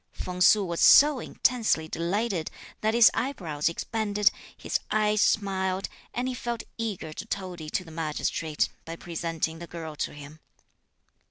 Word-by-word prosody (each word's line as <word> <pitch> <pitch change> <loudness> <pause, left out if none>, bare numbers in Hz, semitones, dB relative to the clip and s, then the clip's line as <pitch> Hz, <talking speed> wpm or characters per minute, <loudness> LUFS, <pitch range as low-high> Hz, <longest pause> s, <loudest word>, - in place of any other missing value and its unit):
Feng 180 0 -6
Su 205 +2 +6
was 170 -2 -3
so 290 -2 +7
intensely 225 -12 +1
delighted 175 +2 -1 0.3
that 220 +1 +1
his 235 -1 +8
eyebrows 170 - -1
expanded, 210 +3 +1 0.3
his - - -1
eyes 215 -1 +2
smiled, 190 -2 +1 0.2
and 245 +2 -2
he 260 - -2
felt 240 -2 -4
eager 205 -9 -4
to 205 - -7
toady 180 -7 -5
to 185 - -1
the 165 - -13
Magistrate 155 -1 -1
(by 165 - -7
presenting 165 -1 -3
the 170 - -8
girl 160 -3 -7
to - - -3
him). 145 +1 -11
185 Hz, 150 wpm, -27 LUFS, 165-215 Hz, 0.3 s, his